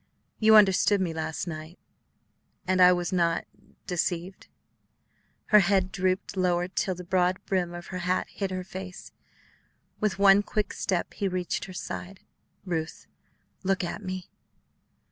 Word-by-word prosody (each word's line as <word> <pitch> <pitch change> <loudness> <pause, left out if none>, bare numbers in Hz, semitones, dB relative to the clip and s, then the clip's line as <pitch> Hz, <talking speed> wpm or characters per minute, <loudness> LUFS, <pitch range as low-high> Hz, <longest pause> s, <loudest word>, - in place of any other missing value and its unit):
"You 220 0 +6
understood 205 0 +5
me 180 -3 -1
last 160 0 -3
night 160 0 -7 0.9
and 185 0 +2
I 180 0 +9
was 175 +1 -1
not 170 -2 +1 0.4
deceived?" 180 +1 -3 1.0
Her 210 - +8
head 190 -1 +2
drooped 185 +1 -1
lower 180 -1 +1
till 185 0 -1
the 180 - -8
broad 180 0 +1
brim 180 -3 -1
of 175 - -8
her 185 - -3
hat 180 +1 0
hid 195 -2 -3
her 185 -1 -4
face. 185 0 -9 0.9
With 215 -3 0
one 200 0 +6
quick 210 -1 -2
step 180 -3 -2
he 200 - -2
reached 180 -1 -2
her 185 - -10
side. 180 +1 -6 0.4
"Ruth, 165 -3 -4 0.6
look 195 0 +1
at 175 - -4
me." 185 -1 -6
185 Hz, 145 wpm, -27 LUFS, 175-195 Hz, 1.0 s, I